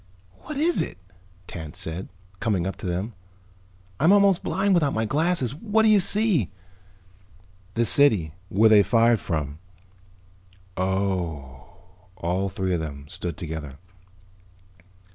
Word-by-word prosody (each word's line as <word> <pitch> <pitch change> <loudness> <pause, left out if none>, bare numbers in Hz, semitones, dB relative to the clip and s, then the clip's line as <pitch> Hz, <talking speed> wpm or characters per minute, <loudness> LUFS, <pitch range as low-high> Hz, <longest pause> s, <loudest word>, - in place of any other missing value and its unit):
"What 305 - -7
is 335 +4 +2
it?" - - -5 0.5
Tance 80 -4 -8
said, 80 +4 -5 0.3
coming 100 -6 0
up 95 - -3
to - - -6
them. 95 +6 -3 0.9
"I'm 160 +5 +5
almost 200 -2 +4
blind 200 -1 +1
without 155 -6 +2
my 110 0 0
glasses. 150 0 0
What 220 +7 +1
do 220 - +5
you 210 -1 +6
see?" 195 - +2 1.3
"The 115 - +2
city. 110 - +3 0.2
Where 110 +4 +4
they 110 -2 +7
fired 115 +1 +3
from." 75 -3 -3 1.2
"Oh." 90 -6 -3 0.4
All 90 +3 -1
three 95 0 -2
of 85 - 0
them 70 -2 -7
stood 90 -3 -5
together. 80 -4 -6
100 Hz, 125 wpm, -24 LUFS, -, 1.3 s, they